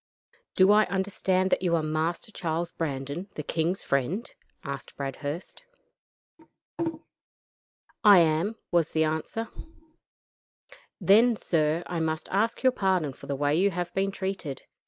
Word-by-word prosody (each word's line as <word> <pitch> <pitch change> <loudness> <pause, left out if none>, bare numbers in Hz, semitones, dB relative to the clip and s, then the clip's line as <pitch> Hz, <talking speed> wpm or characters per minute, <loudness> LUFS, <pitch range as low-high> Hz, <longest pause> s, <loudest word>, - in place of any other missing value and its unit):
"Do 190 +1 +6
I 215 +1 +6
understand 190 0 0
that - - +2
you 175 -2 +2
are 160 - 0
Master 155 +6 -2
Charles 170 -2 -2
Brandon, 145 +4 -4
the 150 - -4
king's 165 +5 -1
friend?" 140 - -1 0.4
asked 140 -2 -6
Bradhurst. 145 +4 -5 2.4
"I 205 -3 +9
am," 165 +6 +3 0.2
was 170 -2 +2
the 160 - +3
answer. 160 +9 -2 1.5
"Then, 225 +4 +5
sir, 160 -3 0
I 175 - -3
must 160 -1 -2
ask 220 +6 0
your 260 - +6
pardon 185 - 0
for 140 - -13
the 140 - -1
way 145 +1 +1
you 190 +4 +3
have 175 -1 -4
been 195 +1 +1
treated. 190 -8 -4
170 Hz, 135 wpm, -27 LUFS, 155-195 Hz, 2.4 s, I